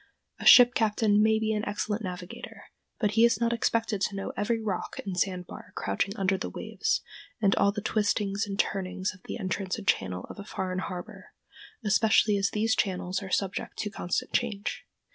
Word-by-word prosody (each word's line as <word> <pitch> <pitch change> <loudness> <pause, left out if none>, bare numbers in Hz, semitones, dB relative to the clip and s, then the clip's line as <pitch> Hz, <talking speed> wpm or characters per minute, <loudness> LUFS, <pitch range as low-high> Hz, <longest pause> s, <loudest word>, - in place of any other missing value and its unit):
A - - -1
ship 245 -1 +9
captain 210 -1 +3
may 220 0 +4
be 220 0 0
an 210 0 -1
excellent 210 +1 -2
navigator, 180 -1 -7 0.4
but 210 -3 +1
he 225 +2 +4
is 235 -3 +4
not 235 0 +1
expected 225 -3 0
to 200 - 0
know 195 - -4
every 225 +2 0
rock 210 -5 -3
and 190 -2 -3
sandbar 180 -1 -3
crouching 180 - -2
under 195 -1 +1
the - - -3
waves, - - -1 0.4
and 200 -3 +3
all 200 - +4
the 210 0 -5
twistings 205 -1 0
and 195 -1 -4
turnings 190 -1 -1
of 185 - -18
the - - -5
entrance 190 -1 -2
and 205 -3 -9
channel 90 -1 0
of - - -10
a - - -6
foreign 185 -2 -3
harbor, 180 -2 -7 0.5
especially 215 0 +4
as 195 0 +1
these 220 +1 +1
channels 185 0 -1
are 195 - -7
subject 195 +1 -2
to 210 - -3
constant 175 -4 -3
change. 215 -4 -2
200 Hz, 185 wpm, -28 LUFS, 190-220 Hz, 0.5 s, ship